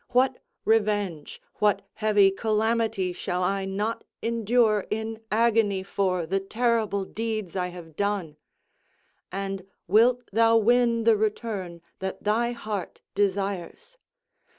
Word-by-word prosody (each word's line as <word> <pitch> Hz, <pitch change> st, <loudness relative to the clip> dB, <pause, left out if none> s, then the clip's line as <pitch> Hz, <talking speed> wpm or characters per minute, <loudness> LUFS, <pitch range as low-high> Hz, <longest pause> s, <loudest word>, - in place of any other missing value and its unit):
What 255 Hz, +1 st, +3 dB, 0.3 s
revenge, 205 Hz, -8 st, 0 dB, 0.2 s
what 205 Hz, -1 st, +2 dB
heavy 210 Hz, -2 st, +4 dB
calamity 220 Hz, -2 st, 0 dB
shall 180 Hz, 0 st, -2 dB
I 195 Hz, +1 st, 0 dB
not 205 Hz, +4 st, -2 dB, 0.2 s
endure 230 Hz, -2 st, +2 dB
in 220 Hz, +1 st, -3 dB
agony 215 Hz, -3 st, +2 dB
for 185 Hz, -3 st, 0 dB
the 195 Hz, +4 st, 0 dB
terrible 220 Hz, -1 st, 0 dB
deeds 215 Hz, -4 st, -4 dB
I 180 Hz, -1 st, 0 dB
have 175 Hz, -3 st, -10 dB
done? 200 Hz, -6 st, -2 dB, 0.9 s
And 195 Hz, 0 st, -3 dB, 0.3 s
wilt 235 Hz, +6 st, +4 dB
thou 230 Hz, +1 st, +5 dB
win 235 Hz, +1 st, +3 dB
the 225 Hz, -1 st, +5 dB
return 205 Hz, -5 st, -3 dB, 0.2 s
that 190 Hz, 0 st, -5 dB
thy 230 Hz, +3 st, +1 dB
heart 215 Hz, -5 st, -5 dB
desires? 200 Hz, -, -2 dB
210 Hz, 115 wpm, -26 LUFS, 190-225 Hz, 0.9 s, thou